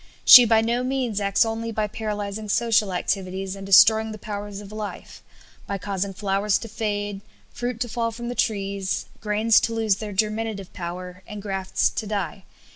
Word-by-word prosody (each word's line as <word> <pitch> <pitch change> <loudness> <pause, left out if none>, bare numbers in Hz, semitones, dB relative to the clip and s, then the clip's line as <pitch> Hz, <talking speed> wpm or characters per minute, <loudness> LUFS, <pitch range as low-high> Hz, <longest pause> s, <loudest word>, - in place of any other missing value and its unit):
She 250 -2 +11
by 225 -1 +4
no 235 +2 0
means 255 -5 -1
acts 200 +2 +3
only 225 +1 -3
by 215 -1 -1
paralyzing 210 0 -5
social 225 -2 +2
activities 190 +1 -2
and 195 - -9
destroying 220 +3 +6
the - - -8
powers 205 -1 -6
of 205 -1 -11
life, 215 -1 -7 0.5
by 200 - -2
causing 195 0 -3
flowers 195 +1 0
to 230 - -8
fade, 205 -2 -3 0.3
fruit 245 -1 -4
to 245 - 0
fall 230 0 -1
from 235 +1 -7
the 245 - -3
trees, 200 -4 -1
grains 215 +1 +3
to 230 - -2
lose 220 -3 +1
their 215 0 -6
germinative 215 -1 -2
power, 180 +1 -7
and 210 - -7
grafts 195 -2 -1
to 215 - -4
die. 195 -3 -4
210 Hz, 175 wpm, -24 LUFS, 195-225 Hz, 0.5 s, She